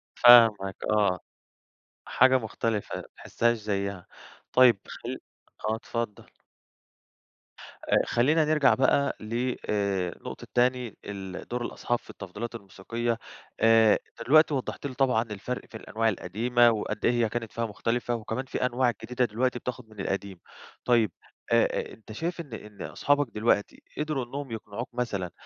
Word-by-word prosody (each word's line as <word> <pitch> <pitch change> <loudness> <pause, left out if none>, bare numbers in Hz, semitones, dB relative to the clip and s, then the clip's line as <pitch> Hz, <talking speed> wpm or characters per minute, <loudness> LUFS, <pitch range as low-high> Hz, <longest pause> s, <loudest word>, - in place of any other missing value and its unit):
فاهمك 115 -5 +7
آه. 105 -4 +2 0.9
حاجة 130 0 +5
مختلفة 110 -2 -2
ما - - -5
تحسهاش 120 0 0
زيها، 100 -3 -3 0.5
طيّب 125 -5 +6
خل - - -6 0.5
آه 110 - +1
اتفضل. 115 -1 -5 1.8
خلينا 150 +7 +3
نرجع 150 -2 +4
بقى 140 +1 +2
ل 120 +3 -2
آآ 100 -4 0
نقطة - - -7
تاني 125 -2 +1
ال 95 -3 -7
دور 125 0 -3
الأصحاب 120 0 -2
في - - -23
التفضيلات 105 +6 -7
الموسيقية. 115 +3 -3 0.4
آآ 115 -1 +6
أنت 115 - -11
دلوقتي 155 +2 +6
وضّحت 135 +1 -3
لي 135 - -7
طبعًا 125 -4 +2
الفرق 115 +3 -5
في 110 - -9
الأنواع 115 +1 -1
القديمة، 115 +5 +2
وقد 105 -1 -3
إيه - - +5
هي 120 -2 +1
كانت 115 -1 -4
فيها 115 - -2
مختلفة، 115 +3 -1
وكمان 115 +3 -4
في 125 - -2
أنواع 125 0 +2
جديدة 125 +2 0
دلوقتي 120 +3 -1
بتاخد 120 -3 -6
من 105 -1 -15
القديم. 100 -1 -3 0.5
طيّب 115 -5 +3 0.4
آآ - - +2
أنت 110 -1 -14
شايف 170 +9 -3
إن 145 -7 -12
إن 105 -2 -9
أصحابك 145 0 +1
دلوقتي 105 -1 +1 0.2
قدروا 150 -4 -1
إنّهم 135 +1 -6
يقنعوك 110 +1 -6
مثلًا 105 -8 -2
115 Hz, 140 wpm, -27 LUFS, 105-125 Hz, 1.8 s, فاهمك